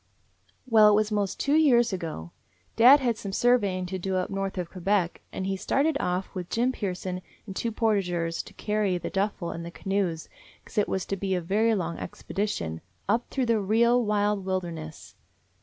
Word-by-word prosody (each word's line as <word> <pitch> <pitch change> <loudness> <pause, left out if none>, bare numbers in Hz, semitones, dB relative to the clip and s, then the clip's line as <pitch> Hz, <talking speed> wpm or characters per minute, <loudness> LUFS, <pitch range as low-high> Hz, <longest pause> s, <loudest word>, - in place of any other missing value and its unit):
Well, 220 -3 +7
it 210 - +5
was 215 +1 +1
'most 205 -2 -1
two 280 - +1
years 245 -8 +4
ago. 160 - -5 0.4
Dad 255 +5 +8
had 240 -4 0
some 200 - -6
surveying 200 -5 +2
to 185 +1 -4
do 190 +1 -2
up 185 +2 -1
north 195 0 -3
of 175 -2 -4
Quebec, 185 -1 0
and 190 - -4
he 195 0 -1
started 280 +10 +1
off 180 -2 -2
with 180 -3 -5
Jim 245 +3 +1
Pearson 185 -5 -4 0.2
and 195 -3 -8
two 230 - -1
port 220 -2 +2
ageurs 170 -3 -2
to - - -13
carry 210 -3 0
the 170 - -5
duffel 195 -3 -1
and 165 - -6
the 170 - -6
canoes, 185 -3 -2 0.4
'cause 215 - -2
it 210 - +1
was 190 - -1
to 195 - -2
be 195 -1 -1
a - - 0
very 215 +6 +2
long 170 -4 -3
expedition, 85 - -4 0.3
up 230 +4 +1
through 265 -2 -1
the 230 -2 +2
real, 235 +4 +3
wild 210 -1 +1
wilderness. 170 -5 -5
195 Hz, 190 wpm, -27 LUFS, 180-220 Hz, 0.4 s, Dad